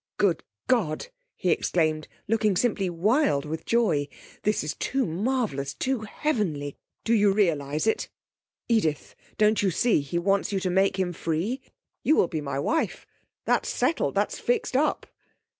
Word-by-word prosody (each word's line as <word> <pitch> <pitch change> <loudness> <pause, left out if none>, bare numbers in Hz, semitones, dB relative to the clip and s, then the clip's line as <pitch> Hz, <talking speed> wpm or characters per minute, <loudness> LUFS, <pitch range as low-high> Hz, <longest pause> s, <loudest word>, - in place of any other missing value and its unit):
'Good 185 -6 +2 0.2
God!' 215 - 0 0.3
he 180 - 0
exclaimed, 155 -3 +1 0.2
looking 215 -2 +2
simply 195 -3 +1
wild 185 - +2
with 160 +2 -5
joy. 175 -12 +2 0.3
'This 210 0 +1
is 150 - -2
too 270 0 -1
marvellous! 175 - -1
too 260 - -1
heavenly! 205 - -2 0.3
Do 230 - +1
you 205 -3 +5
realise 155 -7 +1
it? 220 - 0 0.6
Edith, 185 - 0 0.2
don't 215 0 +4
you 200 - +2
see 195 0 +2
he 140 +5 -3
wants 195 +4 +1
you 195 - 0
to 185 - 0
make 190 +1 +2
him 180 -2 0
free? 175 - -2 0.4
You 310 - +4
will 180 - +4
be 160 -2 -3
my 140 -2 -3
wife 320 - -1 0.4
that's - - +1
settled 330 - 0
that's - - 0
fixed 475 - 0
up.' 300 +3 +1
195 Hz, 155 wpm, -26 LUFS, 155-230 Hz, 0.6 s, you